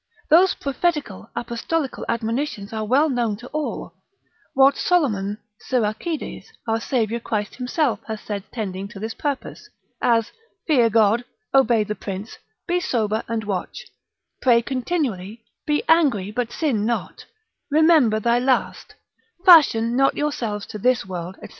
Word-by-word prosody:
Those 360 +4 +6
prophetical, 285 - -2
apostolical 240 +5 -3
admonitions 230 -2 -2
are 220 0 -2
well 265 +8 +3
known 240 -7 -1
to 245 +3 -11
all; 305 -1 -4 0.6
what 270 +1 +6
Solomon, 210 - +1 0.3
Siracides, 250 +7 -2 0.2
our 225 0 +1
Saviour 235 -2 -1
Christ 210 -3 -3
himself 250 -3 0
hath 220 -1 -6
said 200 -2 -4
tending 195 -4 -4
to 200 - -11
this 220 +2 -4
purpose, 285 -3 -5 0.3
as 230 -2 +2 0.3
fear 250 -8 +4
God: 225 +1 +3 0.3
obey 240 -5 +4
the 210 0 -3
prince: 200 +1 -7 0.3
be 355 +1 +1
sober 220 -8 -1
and 225 -1 -2
watch: 205 - -4 0.6
pray 235 -3 +4
continually: 240 - -3 0.2
be 295 -1 +1
angry 265 - +3
but 240 +1 -2
sin 265 -10 0
not: 235 +1 -3 0.4
remember 300 -7 +4
thy 235 +2 +2
last: 255 +1 -1 0.5
fashion 245 - +6
not 270 +1 +3
yourselves 230 -9 -2
to 210 - -8
this 250 +1 +2
world, 180 0 -6
&c. - - -8
235 Hz, 135 wpm, -22 LUFS, 215-280 Hz, 0.6 s, Those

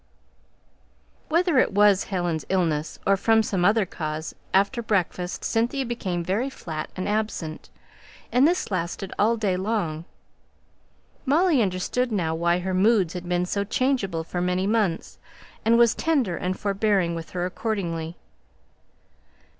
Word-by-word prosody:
Whether 335 -3 +3
it - - +2
was 205 -1 +4
Helen's 175 -5 -2
illness, 160 -5 0
or 195 - +4
from 220 +3 +3
some 190 -4 -1
other 205 +2 +4
cause, 155 -2 -5 0.2
after 200 +6 +2
breakfast 180 -4 -1
Cynthia 240 +4 0
became 190 -8 -3
very 205 +10 -1
flat 160 - -6
and 185 - -3
absent, 205 -7 -3 0.6
and 255 +4 +5
this 350 -9 0
lasted 185 +1 -3
all 225 +3 +3
day 205 -4 0
long. 180 -5 -2 1.2
Molly 305 0 +3
understood 210 +6 -1
now 170 -6 0
why 170 +1 +1
her 185 +1 -3
moods 190 -2 +3
had 180 -1 -6
been 180 0 +1
so 200 +2 -1
changeable 200 -7 0
for 175 +2 -4
many 180 +1 0
months, 205 -5 -1 0.4
and 230 +1 +4
was 235 -1 +5
tender 275 - 0
and 185 +2 -3
forbearing 200 -3 +1
with 165 -1 -6
her 175 - 0
accordingly. 175 -5 -3
195 Hz, 140 wpm, -25 LUFS, 175-225 Hz, 1.2 s, and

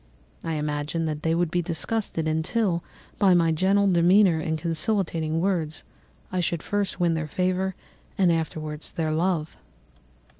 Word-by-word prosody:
I 165 - -2
imagined 150 +2 -2
that 150 -1 -3
they 165 +1 +1
would 170 -1 0
be 175 - +1
disgusted, 170 0 -2
until, 170 +3 0 0.4
by 190 -3 +5
my 165 -1 +3
gentle 195 +4 +3
demeanour 175 0 +5
and 160 0 -1
conciliating 165 -1 -1
words, 165 -4 -1 0.5
I 185 - -1
should 170 -2 -1
first 205 -2 -2
win 175 -1 +2
their 160 -1 -2
favour 185 +3 -1 0.4
and 185 -3 +4
afterwards 155 -2 -3
their 160 -3 -1
love. 160 -1 -1
165 Hz, 145 wpm, -25 LUFS, 160-185 Hz, 0.5 s, by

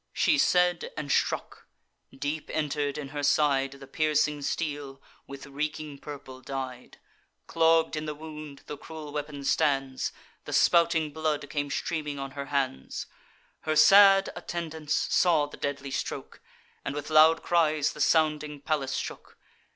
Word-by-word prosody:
She 305 -4 +3
said, 180 -6 +2
and 145 -2 -3
struck; - - -1 0.4
deep 145 +3 -4
enter'd 145 -2 -1
in 145 -2 -6
her 145 +1 -4
side 140 -2 +2
The 140 0 -12
piercing 150 +1 +1
steel, 145 -2 -3 0.3
with 140 0 -9
reeking 150 +1 -4
purple 135 -3 -9
dyed: 130 -2 -6 0.5
Clogg'd 165 -1 +3
in 155 0 -4
the 150 - -4
wound 150 -2 -9
the 150 - -7
cruel 155 -2 -9
weapon 145 -1 -5
stands; 135 -2 +1 0.3
The - - -6
spouting 165 -3 +3
blood 155 -2 -1
came 145 -1 -2
streaming 150 0 -3
on 135 0 -5
her 140 0 -6
hands. 135 - -2 0.5
Her 155 0 -2
sad 195 +4 +7
attendants 160 -3 -3 0.2
saw 165 -5 +4
the 145 - -11
deadly 140 -1 -4
stroke, - - -5 0.4
And 135 - -4
with 145 +1 -5
loud 160 +1 +6
cries 155 -3 +2
the 150 - -7
sounding 150 -1 +2
palace 140 -3 -1
shook. - - -6
150 Hz, 145 wpm, -28 LUFS, 140-155 Hz, 0.5 s, sad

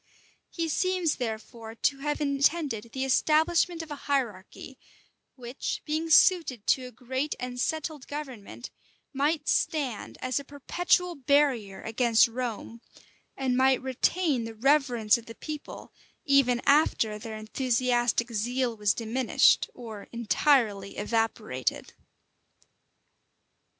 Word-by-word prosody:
He 335 -1 -3
seems 365 0 0
therefore 225 -1 -6
to 275 +4 0
have 295 +1 -2
intended 280 -5 0
the 265 +2 -2
establishment 320 +5 +2
of 315 - -12
a - - -3
hierarchy, 255 -1 -3 0.6
which, 245 +1 -5
being 315 +2 -2
suited 315 - +4
to 255 -1 +1
a - - -11
great 260 +5 -3
and 250 0 -5
settled 310 0 -3
government, 260 -6 -8 0.4
might 290 +2 0
stand 275 -8 -1
as 255 +1 -1
a - - -8
perpetual 350 +6 0
barrier 270 - +1
against 230 +1 +3
Rome, 230 -1 -5 0.6
and 260 -2 0
might 260 0 +4
retain 265 +2 0
the 225 0 -7
reverence 245 -3 +3
of 230 - -16
the 230 - -9
people, 305 -1 -8 0.3
even 275 -4 +3
after 230 -7 +3
their 220 -1 -7
enthusiastic 240 +1 0
zeal 240 +2 -1
was 210 -1 +1
diminished, 235 +2 +2
or 220 -4 -9
entirely 230 -4 +1
evaporated. 215 - -2
255 Hz, 115 wpm, -27 LUFS, 230-290 Hz, 0.6 s, suited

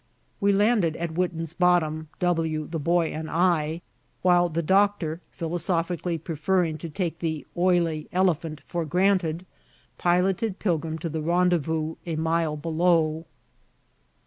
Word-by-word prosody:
We 200 0 +3
landed 200 -5 +2
at 170 -1 -4
Witten's 165 -2 -2
Bottom, 160 -4 +2
W, 165 -3 0
the 165 +1 -4
Boy, 170 +2 +2
and 155 0 -5
I, 165 -1 +1 0.4
while 175 -1 +4
the 170 +1 -2
Doctor, 190 -3 +2
philosophically 170 0 -1
preferring 165 +1 -1
to 165 - -6
take 170 0 -3
the 160 -4 -3
oily 175 -3 +1
elephant 165 -5 0
for 175 -1 -2
granted, 180 0 +1 0.5
piloted 185 +3 +1
Pilgrim 160 -4 -1
to 165 +1 -4
the 160 0 -3
rendezvous 160 -2 +1
a 165 - -2
mile 160 -1 0
below. 160 0 +1
170 Hz, 125 wpm, -25 LUFS, 160-180 Hz, 0.5 s, while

